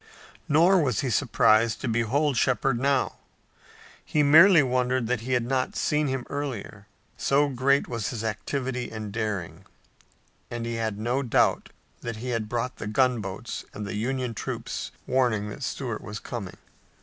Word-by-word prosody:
Nor 170 +5 +5
was 125 -9 0
he 130 - -1
surprised 115 -2 +3
to - - -2
behold 125 +6 +1
Shepard 130 +1 +1
now. 140 +1 +1 0.9
He 150 - +1
merely 160 +3 +8
wondered 125 -1 +1
that 120 -1 -1
he 130 +3 -2
had 120 -2 +1
not 130 - -1
seen 150 -7 +1
him 130 -2 -2
earlier, 120 -7 -5 0.3
so 145 +1 +2
great 140 +2 +2
was 115 -4 -3
his 115 -3 -4
activity 125 +3 -3
and 110 -2 -6
daring, 100 -6 -3 0.9
and 120 -1 -4
he 115 - -3
had 110 -3 -2
no 120 +5 0
doubt 125 -4 +2 0.3
that 115 -1 -5
he 120 +4 -6
had 115 -3 -2
brought 120 +2 -2
the - - -5
gunboats 110 -3 -1
and 105 - -5
the 100 - -5
Union 125 +2 -2
troops - - -4 0.2
warning 120 -5 +1
that - - -9
Stuart 125 -4 -3
was 105 0 -7
coming. 110 -7 -7
125 Hz, 160 wpm, -26 LUFS, 110-135 Hz, 0.9 s, merely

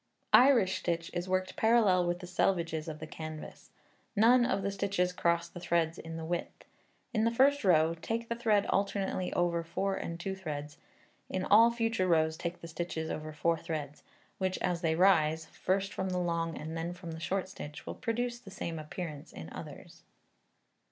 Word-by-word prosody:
Irish 230 -8 +6
stitch 170 -1 -2
is 175 +1 -3
worked 185 0 0
parallel 215 -6 +4
with 175 +1 -1
the - - -6
selvedges 170 -3 0
of 155 -1 -5
the 155 - -7
canvas. 155 0 -8 0.5
None 240 +3 +6
of 195 - 0
the 200 - 0
stitches 195 -2 0
cross 170 -1 +1
the 175 - -10
threads 170 -2 0
in 165 0 -7
the 160 - -5
width. 175 +1 -4 0.5
In 220 -2 +2
the 230 - +4
first 270 +4 +3
row, 165 -4 +4
take 225 +8 -3
the 235 - -1
thread 220 -4 +2
alternately 195 -2 0
over 170 -1 +1
four 195 +4 -1
and 170 0 -5
two 190 +2 -3
threads; 150 -5 -6 0.5
in 185 0 -2
all 225 +3 +7
future 225 -4 0
rows 160 -2 +3
take 170 +2 -5
the 170 - -7
stitches 165 -1 -4
over 155 0 -5
four 165 +2 0
threads, 155 -3 -5 0.4
which, 185 -1 0
as 175 -2 -1
they 160 -2 +1
rise 160 -3 +4
first 195 +4 -1
from 190 - -2
the 180 - -1
long 170 -2 -1
and 160 +2 -6
then 165 +2 -3
from 175 -2 -8
the 160 - -6
short 190 +3 -1
stitch, 150 -5 -9
will - - -4
produce 240 +1 -2
the 220 - -12
same 170 -4 -5
appearance 155 -1 -6
in 80 0 -9
others. - - -10
175 Hz, 185 wpm, -31 LUFS, 165-195 Hz, 0.5 s, all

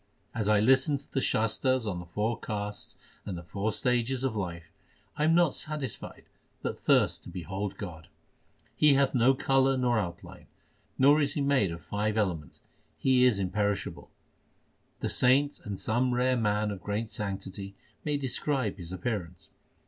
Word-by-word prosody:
As 110 -3 -1
I 105 -1 +5
listen 135 +6 +4
to 140 - -16
the 135 - 0
Shastars 125 +2 +1
on 95 -4 -2
the 90 - -9
four 105 +6 -1
castes 105 -1 -5 0.3
and 95 -4 -5
the 85 - -8
four 100 +6 -2
stages 125 +1 0
of 130 -4 0
life, 85 -5 -5 0.4
I 150 - +1
am 165 +1 +4
not 175 -4 +4
satisfied 150 -7 -5 0.4
but - - -3
thirst - - +3
to - - -8
behold 95 +3 -4
God. 85 -5 -8 0.7
He 150 -2 +5
hath 140 0 +3
no 130 +1 +4
colour 135 0 +2
nor 120 -3 +2
outline, 85 -4 -6 0.5
nor 145 +3 +6
is 145 - 0
He 145 - 0
made 140 -8 +2
of 85 -1 -7
five 105 +5 -1
elements; 90 -8 -2 0.4
He 130 -1 +4
is 125 -5 +4
imperishable. 100 +1 -2 0.9
The - - -1
saints 140 +3 +3
or 100 -2 -3
some 120 +5 0
rare 130 +1 +2
man 105 -2 +1
of 100 -3 -6
great 105 +3 -3
sanctity 100 -1 -5 0.3
may 150 -1 0
describe 130 -4 -1
His 85 -2 -8
appearance. 90 -3 -4
110 Hz, 165 wpm, -29 LUFS, 100-130 Hz, 0.9 s, nor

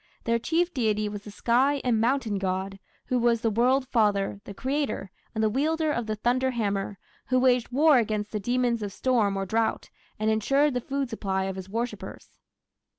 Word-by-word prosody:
Their 230 0 +1
chief 340 +7 0
deity 215 -5 0
was 205 0 -6
the - - -8
sky 255 +7 +2
and 230 -3 +2
mountain 235 -4 +1
god, 190 +1 -2 0.3
who 255 - 0
was 235 -1 +2
the 225 - +1
"World 255 +4 +2
Father", 205 -4 +1
the 200 - -8
creator, 270 -6 -2 0.2
and 220 - 0
the 215 - +3
wielder 310 +6 +1
of 240 -5 -2
the 215 - -1
thunder 250 +4 +1
hammer, 205 -4 -2 0.3
who 255 - +2
waged 250 -1 +2
war 290 +1 +5
against 215 -2 -2
the 210 - -2
demons 240 +1 0
of 205 -1 -4
storm 215 -3 +1
or 195 - -2
drought, 220 +3 -1 0.3
and 215 +1 +1
ensured 275 +7 +2
the 250 - -1
food 275 0 -3
supply 190 -3 -1
of 190 0 -3
his 190 0 -8
worshippers. 230 +4 -5
230 Hz, 190 wpm, -26 LUFS, 205-255 Hz, 0.3 s, war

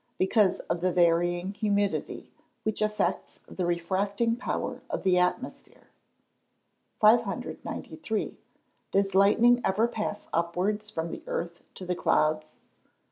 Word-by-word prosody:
_ - - -46
Because 190 +1 +3
of 170 - -3
the 185 0 +2
varying 175 +2 +2
humidity, 205 -1 -1 0.3
which 220 -1 -2
affects 210 0 -1
the 180 -2 -3
refracting 200 +6 0
power 245 - -3
of - - -3
the 185 -1 +4
atmosphere. 180 +8 -3 1.1
593. 220 -1 0 0.5
_Does 195 0 +1
lightning 230 +5 +5
ever 210 +5 +2
pass 215 -3 -4
upwards 185 +6 -1
from 165 -5 -4
the - - -6
earth 170 0 -4
to 185 - -8
the 180 - -1
clouds? 155 -2 +1
195 Hz, 120 wpm, -28 LUFS, 175-215 Hz, 1.1 s, lightning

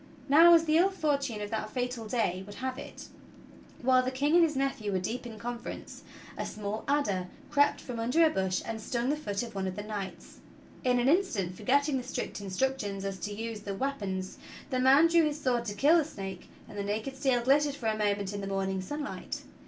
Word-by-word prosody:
Now, 330 +5 +8
as 330 0 +4
the 310 0 +3
ill 365 +3 +5
fortune 280 - -1
of 205 - -5
that 215 -1 -2
fatal 245 -2 -3
day 200 -6 0
would 205 - -9
have 260 +2 -4
it, - - -10 0.7
while 255 0 +5
the 255 - -1
King 280 +4 0
and 345 0 +7
his 310 -3 +1
nephew 265 -6 -1
were 190 - +1
deep 235 +7 -4
in 225 -2 -9
conference, 240 +2 -6 0.3
a - - -3
small 210 +1 -4
adder 205 -11 +1 0.2
crept 285 0 +3
from 245 -3 -6
under 250 +9 +4
a 315 - +3
bush 190 -1 0
and 225 -1 -4
stung 240 +3 -1
the - - +1
foot 205 -8 -3
of 230 -1 -8
one 195 -1 -2
of 185 - -4
the 205 - -5
knights. 205 -3 -7 0.4
In 250 -1 +3
an 245 - +2
instant, 255 - +1
forgetting 280 +5 +2
the 255 - -3
strict 250 -4 -4
instructions 200 -1 -2
as 195 -1 -4
to 210 - -4
the 205 - -5
use 220 -1 -6
of 195 -1 -4
wea 275 +1 +1
pons, 190 -7 -5 0.3
the 255 - +1
man 270 +5 +6
drew 335 0 +5
his 300 -1 -1
sword 245 -4 0
to 205 -2 -4
kill 295 +10 +5
the - - +2
snake, 195 - -7 0.2
and 205 - -8
the - - -1
naked 215 +7 -3
steel 265 -3 +1
glittered 285 +2 +3
for 250 - -9
a 220 -1 +2
moment 205 -2 0
in 200 - -4
the 195 - -4
morning 195 -1 -1
sunlight. 290 +8 -5
240 Hz, 225 wpm, -30 LUFS, 205-280 Hz, 0.7 s, Now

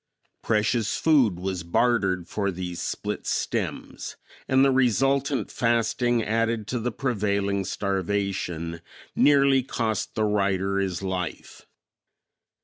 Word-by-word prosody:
Precious 110 +1 +1
food 135 - +3
was 95 -1 -3
bartered 95 -1 +1
for 100 -2 -1
these 90 -2 -5
split - - -4
stems, - - -3 0.3
and 130 +1 +4
the 135 - +4
resultant 135 +2 +1
fasting 120 0 +1
added 115 0 0
to 125 +1 -2
prevailing 100 -6 0
starvation 95 -4 -2 0.3
nearly 140 -2 +5
cost 115 -4 -2
the 110 - +1
writer 100 -2 +1
his 95 -2 -2
life. 90 -3 -5
105 Hz, 105 wpm, -25 LUFS, 95-120 Hz, 0.3 s, nearly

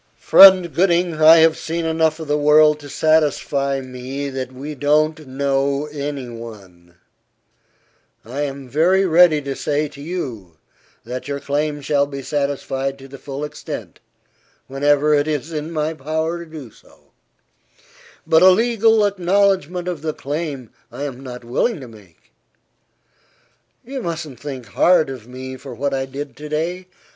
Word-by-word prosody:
"Friend 185 -4 +7
Gooding, 175 -2 +1
I 160 +1 +9
have 160 0 +5
seen 165 +1 -4
enough 160 0 +1
of 160 - -7
the 145 - +1
world 150 +1 +4
to 145 -1 -11
satisfy 145 -3 +1
me 130 +2 -6
that 130 -1 -5
we 140 +4 -7
don't 155 +2 +1
know 140 +1 -1
any 140 -3 -5
one. 100 -7 -12 1.3
I 130 +6 -5
am 140 -2 -5
very 175 +9 +2
ready 165 -3 +5
to 135 -1 -4
say 150 +1 -1
to 140 - -13
you, 120 - -6 0.5
that 125 +2 -6
your 140 0 -3
claim 145 +1 -2
shall 140 0 +1
be 140 -1 -7
satisfied 135 -1 -2
to 135 0 -13
the 135 0 -12
full 140 +1 -6
extent, 150 - -8 0.7
whenever 145 +2 +2
it 145 0 +2
is 150 +1 -3
in 155 0 -4
my 155 -1 -2
power 160 +3 -3
to 170 - -9
do 150 -8 -10
so; - - -24 1.1
but 160 0 +4
a 185 - +8
legal 225 +1 +3
acknowledgment 185 -2 +1
of 175 -5 -4
the 155 -1 -3
claim 145 -4 -5 0.2
I 140 - -6
am 135 -3 -5
not 125 -2 -9
willing 145 - -1
to 130 - -10
make. 105 -7 -18 1.5
You 265 +1 -5
mustn't 160 - -5
think 135 -3 -7
hard 170 -5 +3
of 125 -4 -9
me 130 +1 -8
for 130 -2 -10
what 140 +2 -2
I 135 0 -2
did 140 +2 -7
to 150 0 -8
day. 175 +4 -3
145 Hz, 155 wpm, -20 LUFS, 135-160 Hz, 1.5 s, I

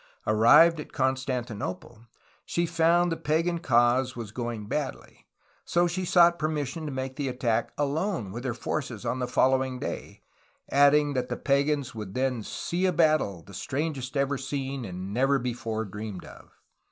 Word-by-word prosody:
'' - - -38
Arrived 150 +10 +6
at 150 - -8
Constanti 130 -2 -1
nople, 105 +4 -7 0.4
she 170 - -1
found 170 +1 +3
that 165 - -1
the - - -21
pagan 165 +3 +1
cause 125 -2 +2
was 115 -3 -6
going 120 -2 -4
badly; 135 +5 -5 0.4
so 175 0 +2
she 180 +2 -2
sought 170 -1 +5
permission 155 0 -2
to - - -4
make 130 0 -4
the 145 -2 -2
attack 120 -3 -1
alone 145 - -1
with 120 +4 -6
her 125 -3 -2
forces 125 -3 -4
on 130 - -1
the 125 - -1
following 130 +1 +2
day, - - -6 0.5
adding 145 +1 +5
that 130 -2 -2
the - - -3
pagans 140 -1 +1
would 105 -4 -7
then 130 -2 0
"see 175 - -2
a - - +2
battle, 155 - +2
the 100 - -14
strangest 135 - -3
ever 140 0 0
seen 135 -1 -4
and 95 +1 -6
never 135 +4 +3
before 115 -3 -3
dreamed 105 -1 -7
of." - - -14
130 Hz, 170 wpm, -27 LUFS, 120-150 Hz, 0.5 s, Arrived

